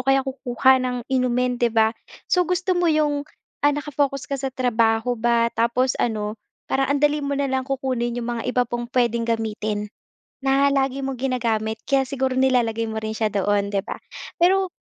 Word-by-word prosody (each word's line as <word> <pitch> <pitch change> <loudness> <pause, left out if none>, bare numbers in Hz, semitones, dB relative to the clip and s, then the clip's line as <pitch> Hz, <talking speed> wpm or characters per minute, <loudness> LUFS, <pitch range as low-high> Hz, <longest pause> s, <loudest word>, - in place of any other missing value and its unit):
kaya 270 +1 +3
kukuha 260 0 +2
ng 250 -1 -1 0.2
inumin 250 -1 +1
'di 240 - +4
ba? 220 0 +3 0.4
So, 360 -2 +3
gusto 365 +1 +1
mo 355 -1 +2
'yong, 295 -2 +1 0.3
ah, 290 0 +4
naka-focus 285 -2 -1
ka 275 -1 -4
sa 270 - -1
trabaho 235 -2 +1
ba 235 0 +2
tapos 245 +3 +1
ano, 210 -3 -1 0.3
parang 270 +1 +1
ang - - -2
dali 295 0 +2
mo 280 0 -2
na 280 - 0
lang 265 0 -2
kukunin 255 -3 -1
'yong 240 0 -3
mga - - -4
iba 250 0 +2
pang 240 0 -4
puwedeng 235 -2 0
gamitin, 215 -2 -1 0.6
na 275 +1 +4
lagi 270 0 0
mong 265 -2 -3
ginagamit. 225 -4 -1
Kaya 270 -1 +1
siguro 265 -1 -1
nilalagay 235 -4 +2
mo 220 0 -4
rin 220 0 -4
siya 215 -2 0
doon, 200 +1 +1
'di 195 - +1
ba. - - -6 0.4
Pero 375 +2 +3
255 Hz, 180 wpm, -23 LUFS, 230-275 Hz, 0.6 s, di